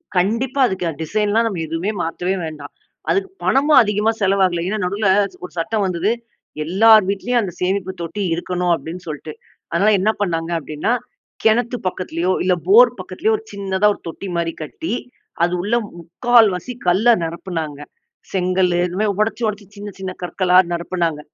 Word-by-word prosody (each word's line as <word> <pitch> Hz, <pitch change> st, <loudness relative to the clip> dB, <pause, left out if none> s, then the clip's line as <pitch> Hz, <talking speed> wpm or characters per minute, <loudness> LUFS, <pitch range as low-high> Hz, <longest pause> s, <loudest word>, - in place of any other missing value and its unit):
கண்டிப்பா 230 Hz, +9 st, 0 dB
அதுக்கு 190 Hz, -3 st, -3 dB
அ -, -, -4 dB
டிசைன்லாம் 210 Hz, +6 st, +1 dB
நம்ம 195 Hz, -6 st, -3 dB
எதுவுமே 165 Hz, +6 st, -2 dB
மாத்தவே 175 Hz, +3 st, -2 dB
வேண்டாம். 150 Hz, -2 st, -8 dB, 0.4 s
அதுக்கு 390 Hz, 0 st, +1 dB
பணமும் 290 Hz, +3 st, +5 dB
அதிகமா 210 Hz, +1 st, +1 dB
செலவாகல. 190 Hz, -3 st, +2 dB
ஏன்னா, 215 Hz, +2 st, -2 dB
நடுல 200 Hz, +3 st, 0 dB, 0.4 s
ஒரு 180 Hz, -, -7 dB
சட்டம் 210 Hz, +5 st, 0 dB
வந்தது. 185 Hz, +3 st, 0 dB, 0.5 s
எல்லார் 215 Hz, +6 st, +6 dB
வீட்டிலேயும் 235 Hz, +5 st, 0 dB
அந்த 190 Hz, -, -4 dB
சேமிப்பு 190 Hz, +1 st, 0 dB
தொட்டி 170 Hz, +5 st, -4 dB
இருக்கணும் 180 Hz, +1 st, -1 dB
அப்பிடீன்னு 165 Hz, +4 st, -5 dB
சொல்லிட்டு. 155 Hz, 0 st, -6 dB, 0.4 s
அதனால 195 Hz, +6 st, +3 dB
என்ன 200 Hz, +4 st, +2 dB
பண்ணாங்க 165 Hz, -3 st, -1 dB
அப்பிடீன்னா, 155 Hz, +7 st, -2 dB, 0.5 s
கிணத்து 235 Hz, +2 st, +2 dB
பக்கத்திலயோ 180 Hz, -1 st, -2 dB
இல்ல 185 Hz, 0 st, +3 dB
போர் 465 Hz, +5 st, +8 dB
பக்கத்திலயோ 440 Hz, +1 st, -1 dB
ஒரு 430 Hz, -, -13 dB
சின்னதா 195 Hz, 0 st, 0 dB
ஒரு -, -, -14 dB
தொட்டி 165 Hz, +4 st, -6 dB
மாரி 170 Hz, -1 st, -1 dB
கட்டி, 275 Hz, -, -5 dB, 0.5 s
அது 175 Hz, +1 st, +2 dB
உள்ள 210 Hz, +6 st, 0 dB, 0.2 s
முக்கால்வாசி 220 Hz, +4 st, +2 dB
கல்ல 190 Hz, +7 st, +4 dB
நிரப்புனாங்க. 165 Hz, -3 st, -4 dB, 0.5 s
செங்கலு 180 Hz, -1 st, +1 dB
இது 180 Hz, +1 st, -6 dB
மாரி 215 Hz, -, +2 dB
உடைச்சு, 225 Hz, +2 st, 0 dB
உடைச்சு 210 Hz, -1 st, -4 dB
சின்ன, 205 Hz, 0 st, -7 dB
சின்ன 190 Hz, -1 st, -4 dB
கற்களா 180 Hz, +1 st, +2 dB, 0.2 s
நிரப்பினாங்க, 170 Hz, -2 st, -1 dB
190 Hz, 150 wpm, -20 LUFS, 170-215 Hz, 0.5 s, போர்